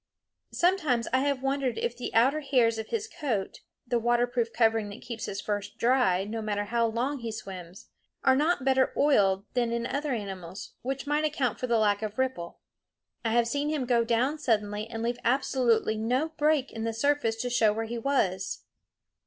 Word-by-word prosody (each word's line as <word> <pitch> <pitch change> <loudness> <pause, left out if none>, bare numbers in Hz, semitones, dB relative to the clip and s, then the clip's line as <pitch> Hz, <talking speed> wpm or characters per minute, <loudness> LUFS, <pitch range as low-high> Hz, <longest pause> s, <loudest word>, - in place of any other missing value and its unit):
Sometimes 310 -10 +1
I 260 - +4
have 275 -1 0
wondered 270 -3 0
if 235 0 -2
the 245 - -5
outer 265 +7 +4
hairs 245 -6 +2
of 220 - -5
his 455 -1 -2
coat 240 - -3 0.3
the 240 -1 0
waterproof 240 0 +1
covering 225 -2 +2
that 205 - -10
keeps 235 -2 -5
his 195 - -4
fur 205 -1 -1 0.2
dry, 235 -7 +3
no 220 +3 -4
matter 205 -1 -1
how 230 +2 +1
long 250 +5 -1
he 230 -2 -4
swims 190 -3 -9 0.3
are 265 -1 +5
not 295 -1 +1
better 265 -1 +3
oiled 200 -9 +3
than 240 -2 +1
in 235 0 -1
other 285 +3 -2
animals, 195 -5 -6
which 270 +2 -3
might 295 +1 +1
account 285 -5 0
for 255 - -2
the 235 -1 +3
lack 205 -1 +2
of 215 -1 -4
ripple. 260 -10 -2 0.6
I 225 - 0
have 235 0 +3
seen 285 +4 -1
him 300 -4 -1
go 240 -1 +3
down 245 +6 +1
suddenly 210 -5 0
and 225 0 -5
leave 240 +1 -1
absolutely 240 -3 +2
no 250 +8 0
break 305 -3 +1
in 225 - -5
the 225 0 -1
surface 285 -1 +1
to 245 +2 -3
show 225 -3 +4
where 225 +2 -2
he 235 +1 -4
was. 210 -8 0
235 Hz, 190 wpm, -28 LUFS, 220-270 Hz, 0.6 s, are